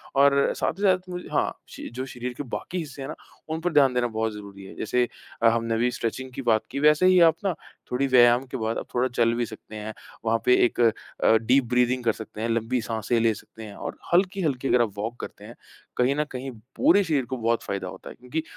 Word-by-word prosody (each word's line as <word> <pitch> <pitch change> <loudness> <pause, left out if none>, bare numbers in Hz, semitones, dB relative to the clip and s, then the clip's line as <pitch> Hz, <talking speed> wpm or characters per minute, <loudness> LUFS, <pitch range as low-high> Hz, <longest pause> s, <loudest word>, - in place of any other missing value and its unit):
और 140 0 +4
साथ - - -1
ही - - -4
साथ 190 -2 +5
में 180 0 -4
जो - - -12
हाँ, - - +1
शि - - -8
जो 130 +1 -3
शरीर 125 -1 -6
के - - -3
बाकी 140 +7 -5
हिस्से 145 -5 -6
हैं 135 - -5
ना, - - -5 0.3
उन 160 0 -2
पर 175 0 -1
ध्यान 140 -3 +5
देना 125 -1 +1
बहुत 110 -1 -2
ज़रूरी 100 -2 -10
है, - - -11
जैसे 125 +2 0 0.3
अ, 115 - +6
हमने 115 0 0
अभी 120 +2 +1
स्ट्रेचिंग 130 +3 -4
की 135 - -5
बात 115 -4 +3
की, 140 - -3
वैसे 150 +4 +5
ही 185 0 +6
आप - - -1
ना, 190 - +2 0.4
थोड़ी 125 +2 +1
व्यायाम 120 -1 +5
के 130 - -3
बाद 110 -1 -2
आप - - -4
थोड़ा 125 +1 +2
चल 115 -1 +3
भी 120 0 0
सकते 110 0 -11
हैं। 110 +1 -6 0.3
वहाँ 115 0 +2
पे 125 - +6
एक 120 - -2
अ, 115 0 +2
डीप 125 +5 +3
ब्रीदिंग 125 0 +2
कर 115 - +3
सकते 110 0 -9
हैं, 115 - -1
लंबी 115 +2 0
साँसे 115 +1 -1
ले 115 -1 +3
सकते 110 +2 -12
हैं 105 -2 -9
और - - -6 0.2
हल्की-हल्की 175 -8 +1
अगर 125 - +4
आप 115 -3 +1
वॉक 115 +4 -4
करते - - -8
हैं, - - -11 0.4
कहीं 125 +3 +2
न 150 - +1
कहीं 130 +1 -5 0.2
पूरे 270 -8 +5
शरीर 150 -7 0
को 130 +1 -4
बहुत 115 0 0
फायदा 100 -2 -4
होता 95 +1 -9
है। - - -10
क्योंकि 135 +6 -4
125 Hz, 245 wpm, -25 LUFS, 115-140 Hz, 0.4 s, अ